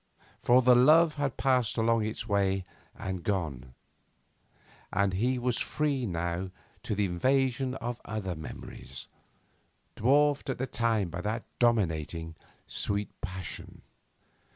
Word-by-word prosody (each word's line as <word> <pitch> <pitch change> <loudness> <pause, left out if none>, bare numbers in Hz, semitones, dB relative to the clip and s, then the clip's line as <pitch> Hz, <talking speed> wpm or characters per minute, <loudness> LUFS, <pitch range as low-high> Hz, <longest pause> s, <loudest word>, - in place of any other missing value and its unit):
For 125 +1 +5
the 125 0 +7
love 155 +6 +6
had 140 -4 -1
passed 125 -5 +2
along 115 -1 +2
its 110 0 -5
way 95 -2 +1 0.3
and 95 -2 -4
gone, 70 -11 -2 1.2
and 100 0 +1
he 125 +7 +1
was 125 -1 0
free 140 -5 0
now 85 +1 -2 0.3
to 105 - -2
the 105 0 +2
invasion 130 +7 +1
of 120 -1 -4
other 105 -4 -3
memories, 75 -4 -8 0.9
dwarfed 145 +4 +3
at 130 - -1
the 130 - -1
time 115 -6 0
by 90 +1 -4
that 110 +4 -2 0.2
dominating, 80 -8 +1 0.3
sweet 100 0 -2
passion. 95 +2 -7
110 Hz, 125 wpm, -29 LUFS, 95-125 Hz, 1.2 s, the